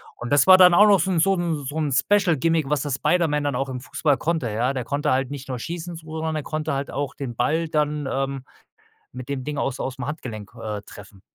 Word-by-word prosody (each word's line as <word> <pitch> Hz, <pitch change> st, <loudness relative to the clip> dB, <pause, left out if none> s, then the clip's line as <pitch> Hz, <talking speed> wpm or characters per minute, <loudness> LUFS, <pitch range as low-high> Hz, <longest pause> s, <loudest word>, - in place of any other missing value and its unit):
Und 120 Hz, -, -7 dB
das 145 Hz, +5 st, +4 dB
war 185 Hz, 0 st, +10 dB
dann 180 Hz, -1 st, +7 dB
auch 210 Hz, +4 st, +7 dB
noch 200 Hz, -3 st, +5 dB
so 190 Hz, +4 st, 0 dB
'n 170 Hz, -, +1 dB
so 195 Hz, +3 st, +3 dB
'n 165 Hz, -5 st, -2 dB
so 145 Hz, +4 st, -5 dB
'n 150 Hz, -3 st, 0 dB
Special 180 Hz, +3 st, +2 dB
Gimmick, 160 Hz, 0 st, +1 dB
was 150 Hz, -1 st, +1 dB
das 145 Hz, -3 st, -2 dB
Spider-Man 150 Hz, -2 st, +1 dB
dann 145 Hz, -3 st, -1 dB
auch 135 Hz, +1 st, -2 dB
im 125 Hz, -1 st, -5 dB
Fußball 145 Hz, 0 st, 0 dB
konnte, 160 Hz, -8 st, -1 dB
ja. 120 Hz, +5 st, 0 dB
Der 125 Hz, -3 st, -4 dB
konnte 140 Hz, +1 st, -1 dB
halt 130 Hz, +1 st, 0 dB
nicht 140 Hz, -1 st, -7 dB
nur 125 Hz, -2 st, -3 dB
schießen, 170 Hz, +4 st, -6 dB
so 160 Hz, -1 st, -9 dB
sondern 160 Hz, 0 st, -2 dB
er 150 Hz, -, -3 dB
konnte 155 Hz, -1 st, -3 dB
halt 140 Hz, +1 st, -3 dB
auch 140 Hz, 0 st, -3 dB
den 125 Hz, -4 st, -6 dB
Ball 160 Hz, +7 st, 0 dB
dann, 150 Hz, -2 st, -1 dB
ähm, 135 Hz, -1 st, -2 dB, 0.7 s
mit 125 Hz, +1 st, -8 dB
dem 135 Hz, -2 st, -3 dB
Ding 150 Hz, -1 st, -4 dB
aus 135 Hz, -, -2 dB
ausm 130 Hz, +1 st, -4 dB
Handgelenk, 115 Hz, -, -6 dB
äh, 105 Hz, -2 st, -4 dB
treffen. 100 Hz, -2 st, -14 dB
145 Hz, 250 wpm, -23 LUFS, 130-160 Hz, 0.7 s, war